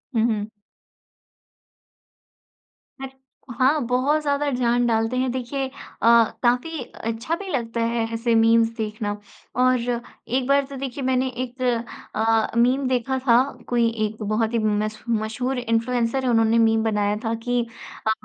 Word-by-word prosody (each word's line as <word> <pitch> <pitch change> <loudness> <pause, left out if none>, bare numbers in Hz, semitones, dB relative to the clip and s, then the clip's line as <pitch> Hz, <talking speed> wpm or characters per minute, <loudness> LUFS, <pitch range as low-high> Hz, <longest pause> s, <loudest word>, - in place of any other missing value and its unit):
हुँ, 225 - +3
हुँ। 210 0 -3 2.5
हट। 270 -1 -6 0.5
हाँ, 270 +4 +4
बहुत 270 +5 +2
ज़्यादा 285 0 0
जान 245 -1 +1
डालते 225 +2 +1
हैं, 255 0 +1
देखिए 260 +2 -3
अ, 260 - -13 0.7
काफ़ी 250 +6 +1
अच्छा 230 +7 -4
भी 395 +2 -8
लगता 235 -6 -2
है 230 0 0
ऐसे 230 0 +1
मीम्स 225 0 +4
देखना। 210 -1 -3 0.4
और 255 +1 +3 0.5
एक 255 +1 0
बार 280 0 +3
तो 275 0 -9
देखिए, 270 0 -5
मैंने 260 0 +1 0.2
एक 255 +1 -9 0.5
अ, 225 0 +2
मीम 255 +3 +3
देखा 260 +1 0
था, 235 0 +6 0.3
कोई 235 -1 +2 0.2
एक 215 +1 -6
बहुत 220 +2 0
ही 230 - +2
मश 215 0 -1
मशहूर 230 +4 -1
इन्फ्लुएंसर 240 +2 0
है, 255 - +1
उन्होंने 225 -1 +3
मीम 225 -1 +3
बनाया 210 -2 +1
था 225 - 0
कि 245 0 +2 0.5
अ, - - +4
240 Hz, 145 wpm, -23 LUFS, 225-260 Hz, 2.5 s, था